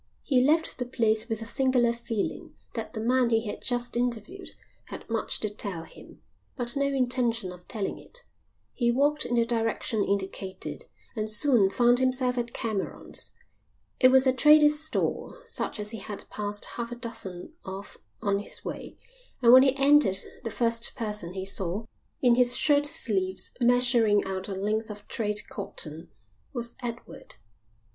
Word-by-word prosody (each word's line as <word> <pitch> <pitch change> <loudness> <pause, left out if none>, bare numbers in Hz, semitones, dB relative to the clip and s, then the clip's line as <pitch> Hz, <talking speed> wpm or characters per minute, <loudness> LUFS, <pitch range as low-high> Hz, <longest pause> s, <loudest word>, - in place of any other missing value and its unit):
He 255 -4 +3
left 315 +2 +2
the 250 - -1
place 225 -2 +1
with 225 0 -2
a - - -7
singular 250 -1 +2
feeling 230 -3 -4 0.2
that - - -5
the 220 - -4
man 245 +2 +2
he 225 0 +1
had 205 - -5
just 245 -1 -1
interviewed 245 - -3 0.4
had - - -9
much 225 -1 0
to 215 - 0
tell 200 -5 -2
him, - - -15 0.3
but 245 -1 -3
no 280 0 +1
intention 245 -7 0
of 180 0 -16
telling 210 -4 -4
it. - - -11 0.5
He 240 -2 +1
walked 290 +4 +1
in 240 - -1
the 235 -1 +3
direction 225 -2 -1
indicated 190 -1 -4 0.3
and 215 -1 -2
soon 215 -2 +3
found 240 +3 +3
himself 255 -1 +1
at 235 0 -3
Cameron's. 215 -5 -2 0.7
It 255 - +7
was 265 +1 +5
a 260 - +4
trader's 300 +2 +6
store, 315 +9 -1
such 465 - -3
as 210 0 -3
he 225 - -6
had 205 +1 -8
passed 205 0 -3
half 235 0 -5
a - - -4
dozen 230 - -5
of 195 +1 -8 0.2
on 200 0 +1
his 205 - -5
way, - - -7 0.4
and 240 -2 +6
when 260 - +10
he 265 0 +3
entered 275 -8 +4 0.3
the 230 - -3
first 230 +1 0
person 210 -7 -4
he 190 0 -4
saw, 195 +2 -2 0.4
in 245 -1 +6
his 245 0 +4
shirt 290 -1 +4
sleeves, 195 -11 0
measuring 240 -4 +4
out 190 0 -4
a 195 - -4
length 215 +3 -1
of 205 -1 -9
trade 210 -2 -2
cotton, 165 -4 -7 0.4
was 235 -1 -3
Edward. 240 -1 -8
235 Hz, 165 wpm, -27 LUFS, 205-255 Hz, 0.7 s, when